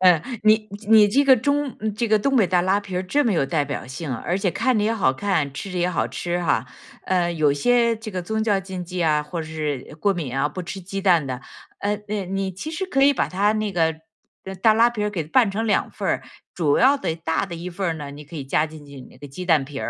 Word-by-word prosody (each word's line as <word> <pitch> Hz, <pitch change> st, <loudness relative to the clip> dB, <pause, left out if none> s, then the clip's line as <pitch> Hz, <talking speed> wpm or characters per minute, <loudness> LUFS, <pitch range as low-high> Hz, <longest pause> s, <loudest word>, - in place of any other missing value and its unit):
嗯， 180 Hz, -4 st, +5 dB, 0.2 s
你 215 Hz, 0 st, +4 dB, 0.2 s
你 215 Hz, -2 st, +7 dB
这 280 Hz, +7 st, +3 dB
个 265 Hz, -1 st, +7 dB
中 285 Hz, +2 st, -1 dB, 0.2 s
这 235 Hz, +1 st, 0 dB
个 215 Hz, 0 st, +3 dB
东 275 Hz, +5 st, +1 dB
北 215 Hz, -7 st, +4 dB
大 180 Hz, 0 st, +2 dB
拉 190 Hz, +3 st, +2 dB
皮 190 Hz, -2 st, -4 dB
这 285 Hz, +9 st, +1 dB
么 225 Hz, -, +2 dB
有 140 Hz, -6 st, +1 dB
代 150 Hz, -3 st, 0 dB
表 140 Hz, -2 st, -5 dB
性， 130 Hz, +1 st, -5 dB
而 175 Hz, +10 st, -2 dB
且 195 Hz, -1 st, 0 dB
看 255 Hz, +6 st, +1 dB
着 205 Hz, -, +1 dB
也 225 Hz, -, +1 dB
好 185 Hz, -12 st, +2 dB
看， 155 Hz, -4 st, -1 dB
吃 195 Hz, -, -6 dB
着 180 Hz, -, -2 dB
也 175 Hz, +1 st, +1 dB
好 170 Hz, -, 0 dB
吃 175 Hz, 0 st, -3 dB
哈。 140 Hz, -4 st, +1 dB, 0.4 s
呃， 175 Hz, -2 st, +1 dB
有 150 Hz, -3 st, +2 dB
些 235 Hz, +9 st, +2 dB
这 220 Hz, 0 st, -8 dB
个 185 Hz, -2 st, -3 dB
宗 220 Hz, +5 st, -2 dB
教 200 Hz, -3 st, +2 dB
禁 185 Hz, -1 st, -6 dB
忌 180 Hz, 0 st, -3 dB
啊， 150 Hz, -2 st, +2 dB
或 165 Hz, +3 st, -5 dB
者 155 Hz, -, -6 dB
是 150 Hz, -4 st, -4 dB
过 200 Hz, +3 st, +3 dB
敏 145 Hz, -8 st, -4 dB
啊， 145 Hz, -, +2 dB
不 185 Hz, -, -6 dB
吃 190 Hz, +2 st, -6 dB
鸡 195 Hz, +2 st, -5 dB
蛋 175 Hz, -7 st, +3 dB
的， 130 Hz, 0 st, -4 dB, 0.4 s
嗯， 205 Hz, +1 st, -2 dB
那 205 Hz, -3 st, -2 dB
你 195 Hz, 0 st, -2 dB
其 305 Hz, -, -6 dB
实 355 Hz, +4 st, -3 dB
可 275 Hz, -7 st, +1 dB
以 285 Hz, +1 st, +6 dB
把 -, -, +1 dB
它 200 Hz, +3 st, +2 dB
那 215 Hz, -2 st, -2 dB
个 160 Hz, -3 st, +1 dB, 0.7 s
大 220 Hz, -1 st, +6 dB
拉 235 Hz, +2 st, +5 dB
皮 210 Hz, -3 st, -2 dB
给 175 Hz, -7 st, -3 dB
拌 220 Hz, -, +3 dB
成 225 Hz, +3 st, -2 dB
2 205 Hz, -, +1 dB
份 -, -, -5 dB
儿。 -, -, 0 dB, 0.3 s
主 150 Hz, -5 st, +2 dB
要 270 Hz, +3 st, +5 dB
的 165 Hz, -, -2 dB
大 160 Hz, +2 st, -1 dB
的 175 Hz, -, -7 dB
一 170 Hz, +2 st, -6 dB
份 170 Hz, -2 st, -2 dB
呢， 145 Hz, -1 st, -6 dB
你 145 Hz, +1 st, -10 dB
可 160 Hz, -, -10 dB
以 140 Hz, -, -5 dB
加 150 Hz, +3 st, +1 dB
进 155 Hz, -1 st, -12 dB
去 140 Hz, -1 st, -11 dB
那 -, -, -16 dB
个 145 Hz, -, -9 dB
鸡 180 Hz, +7 st, -7 dB
蛋 160 Hz, -5 st, +3 dB
皮， 140 Hz, 0 st, -10 dB
185 Hz, 275 characters per minute, -23 LUFS, 160-215 Hz, 0.7 s, 你